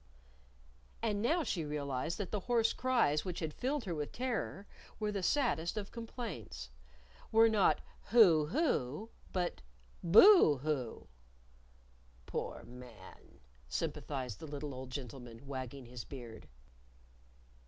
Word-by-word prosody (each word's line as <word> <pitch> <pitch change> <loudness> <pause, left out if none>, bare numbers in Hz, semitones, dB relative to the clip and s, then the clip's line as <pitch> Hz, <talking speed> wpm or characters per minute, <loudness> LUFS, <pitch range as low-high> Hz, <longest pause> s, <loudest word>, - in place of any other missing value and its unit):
And 210 -3 0
now 320 +9 +2
she 185 - -1
realized 145 +1 -2
that 200 -4 -4
the 210 - 0
hoarse 230 +2 +2
cries 235 - +2
which 180 -3 -4
had 155 -2 -3
filled 265 - -1
her 180 - -3
with 150 -2 -3
terror 235 -5 -3 0.3
were 210 -1 0
the 200 -2 -2
saddest 185 - +1
of 205 -1 -4
complaints! 210 - -6 0.6
were 225 +1 +7
not 215 -4 +3 0.2
"Hoo! 175 -10 +6
hoo!" 220 - 0 0.2
but 180 -2 -2 0.4
"Boo! 200 - +8
hoo!" 140 -7 -2 1.2
"Poor - - -4
man!" 120 -5 -13 0.3
sympathized 125 - -3
the 160 - -7
little 145 -1 -5
old 130 0 -7
gentleman, 125 -2 -8
wagging 130 -1 -6
his 120 -1 -7
beard. 120 -5 -9
160 Hz, 120 wpm, -34 LUFS, -, 1.2 s, Boo